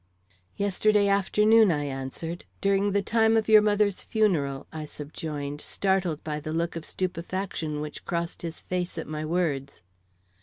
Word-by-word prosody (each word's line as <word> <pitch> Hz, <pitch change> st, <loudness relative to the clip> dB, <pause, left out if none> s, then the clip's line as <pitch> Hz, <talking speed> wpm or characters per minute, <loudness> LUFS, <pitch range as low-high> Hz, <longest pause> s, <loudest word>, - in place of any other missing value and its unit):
"Yesterday 205 Hz, +1 st, +3 dB
afternoon," 210 Hz, +2 st, +4 dB
I 145 Hz, -2 st, 0 dB
answered. 140 Hz, +5 st, -5 dB
"During 200 Hz, +1 st, +2 dB
the 200 Hz, 0 st, +1 dB
time 225 Hz, +1 st, +3 dB
of 220 Hz, -, +1 dB
your 215 Hz, -1 st, +8 dB
mother's 205 Hz, -2 st, +2 dB
funeral," 160 Hz, -12 st, 0 dB
I 155 Hz, -1 st, -5 dB
subjoined, 145 Hz, -1 st, -6 dB
startled 190 Hz, -5 st, 0 dB
by 150 Hz, -1 st, -3 dB
the 155 Hz, +1 st, -5 dB
look 170 Hz, +1 st, -1 dB
of 165 Hz, -1 st, -5 dB
stupefaction 175 Hz, -3 st, -3 dB
which 150 Hz, 0 st, -7 dB
crossed 170 Hz, 0 st, -3 dB
his 165 Hz, -2 st, -5 dB
face 180 Hz, -1 st, -3 dB
at 160 Hz, -, -3 dB
my 155 Hz, 0 st, -4 dB
words. 155 Hz, -, -2 dB
170 Hz, 150 wpm, -27 LUFS, 150-200 Hz, -, your